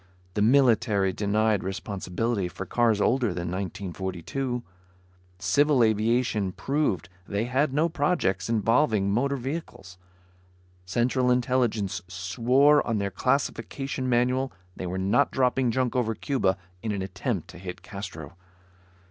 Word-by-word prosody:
The 105 - -1
military 110 -5 +3
denied 105 +1 +1
responsibility 95 +2 -2
for 95 +2 -7
cars 115 +1 +2
older 120 -3 +2
than 85 -1 -3
1942. 95 +6 -4 0.7
Civil 140 +6 +3
aviation 110 -2 +1
proved 135 - -1 0.2
they 100 +2 -1
had 130 +4 +1
no 150 +5 +2
projects 145 - 0
involving 110 -2 +2
motor 140 +6 +1
vehicles. 130 - -6 0.9
Central 125 +5 +1
Intelligence 120 -7 +1
swore 120 +11 +3
on 115 - 0
their 100 -1 -1
classification 135 +3 -1
manual 125 +2 +1 0.2
they 90 - -5
were 90 +1 -3
not 95 +5 +2
dropping 130 -1 +1
junk 125 +1 0
over 115 -3 +1
Cuba 100 -9 0 0.2
in 110 - -2
an 100 -2 -2
attempt 90 -2 -3
to - - -11
hit 90 -1 -8
Castro. 85 -7 -8
115 Hz, 120 wpm, -26 LUFS, 95-130 Hz, 0.9 s, military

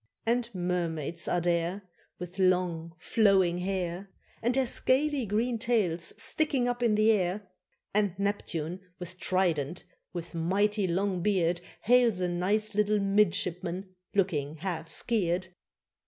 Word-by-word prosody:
And 235 +1 +1
mermaids 170 -3 -2
are 175 - +1
there, 175 +3 0 0.3
With 180 +2 -8
long 180 -3 +1
flowing 190 -3 +3
hair, 185 0 -3 0.3
And 240 +2 +1
their 265 -1 +3
scaly 265 +1 +1
green 225 +4 0
tails 205 -9 0
sticking 280 -5 +1
up 245 0 -2
in 230 -3 +3
the 215 +1 +5
air; 195 0 0 0.5
And 200 -3 +1
Neptune 185 -4 -2 0.2
with 180 +1 -8
trident, 175 -5 0 0.3
with 170 -1 -6
mighty 195 +4 +1
long 185 +1 0
beard, 175 -3 +1 0.2
Hails 240 -4 +4
a 180 - +1
nice 205 +5 0
little 210 +1 +2
midshipman, 185 -2 0 0.2
looking 155 -7 0
half 165 -1 -4
"skeer'd." 185 -5 0
185 Hz, 125 wpm, -29 LUFS, 175-210 Hz, 0.5 s, the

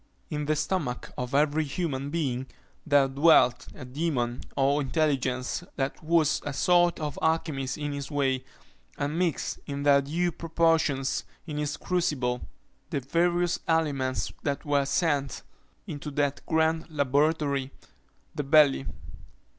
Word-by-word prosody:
In 150 -1 -2
the 155 - +2
stomach 150 -5 -2
of 125 +2 -3
every 150 +2 +3
human 140 -2 -3
being 135 -5 -2 0.4
there 145 -2 +5
dwelt 135 -2 +4
a 130 - -9
demon, 125 -3 -2 0.2
or 140 +2 +3
intelligence, 135 -1 0
that 135 +2 -3
was 160 -1 +2
a 145 - -4
sort 175 +5 +3
of 150 -2 -4
alchymist 155 -5 0
in 145 -1 -3
his 140 -1 -5
way, 135 -3 0 0.5
and 150 +3 -2
mixed, 175 -5 -1
in 140 0 -4
their 140 -1 +5
due 170 +6 -1
proportions, 160 -4 +1 0.2
in 150 -3 -5
his 150 -1 -2
crucible, 130 -9 -1 0.5
the - - -1
various 175 +5 +1
aliments 145 -6 0
that 140 -1 -2
were 145 -1 +2
sent 140 -2 0 0.4
into 145 +1 -6
that 145 -1 -1
grand 160 0 +1
laboratory, 145 -1 +1 0.6
the 145 - -3
belly. 140 -1 +4
145 Hz, 130 wpm, -27 LUFS, 135-160 Hz, 0.6 s, there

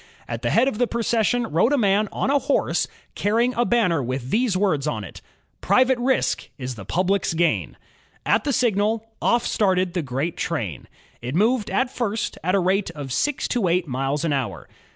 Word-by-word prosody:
At - - -4
the - - 0
head 240 +4 +3
of 235 -5 -2
the 245 - +3
procession 235 +1 +1
rode 215 - +2
a 290 - +3
man 205 -2 +2
on 270 - -1
a 285 - +4
horse, - - 0 0.3
carrying 230 +4 +1
a 240 0 +1
banner 195 -11 +2
with 130 +1 -4
these 225 -4 +2
words 160 -8 +1
on 110 -8 -2
it: 90 - -10 0.4
^'Private 255 0 +3
Risk 260 +2 0
is 130 -2 -5
the 100 -5 -10
Public^s 185 0 0
Gain^ 170 +1 0 0.5
At - - +2
the 290 - 0
signal, 225 -2 +1
off 240 0 +2
started 185 -3 +1
the 180 - 0
great 140 +4 -3
train. 105 - -3 0.3
It 125 +4 -4
moved 220 +3 +2
at 250 +6 0
first 225 -4 -2
at 185 +3 +1
a - - +3
rate 190 +2 +1
of 140 -4 -5
six 280 - 0
to 235 -7 +1
eight 175 0 +1
miles 135 +4 -1
an 155 - +1
hour. 100 - -3
195 Hz, 195 wpm, -23 LUFS, 150-235 Hz, 0.5 s, a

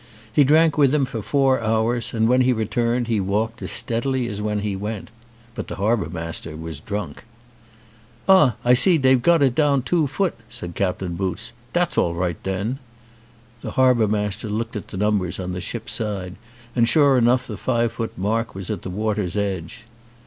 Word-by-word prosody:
He 145 - +5
drank 155 +2 +4
with 140 0 +4
him 140 -3 +2
for 115 -3 -5
four 135 +3 +2
hours, 115 +2 0
and 110 -1 +1
when 125 +2 +4
he 125 0 +3
returned 120 +2 0
he 115 -3 +1
walked 110 +5 -1
as - - -3
steadily 125 +2 0
as 105 -2 -4
when 105 -1 -1
he 100 -1 -2
went. 105 +2 -5 0.4
But - - -6
the - - -5
harbour 105 -1 0
master 80 -2 -5
was 80 -2 -7
drunk. 100 +4 -5 1.0
"Ah, 170 - +6
I 125 - +6
see 170 +7 +5
dey've 130 -3 +4
got 165 +2 +4
it 130 -3 +3
down 140 -2 +2
two 160 +1 +1
foot," 180 +7 -1 0.2
said 85 0 -7
Captain 90 -1 -2
Boots. 95 +6 -3 0.2
"Dat's 175 0 +1
all 85 -1 +1
right 85 -1 -2
den." 100 +7 -2 0.8
The - - -6
harbour 125 -4 +4
master 105 +1 -2
looked 115 +3 -3
at 105 - -5
the - - -8
numbers 100 -3 0
on 90 -1 -4
the 90 0 -4
ship's - - -4
side 95 -4 -3 0.4
and 120 -1 +3
sure 140 +1 +5
enough 125 +1 +3
the - - -6
five 120 -2 0
foot 115 -1 -5
mark 110 +4 -1
was 95 +1 -5
at 105 - -4
the - - -6
water's 105 -1 -2
edge. 100 0 -3
110 Hz, 190 wpm, -22 LUFS, 100-130 Hz, 1.0 s, Ah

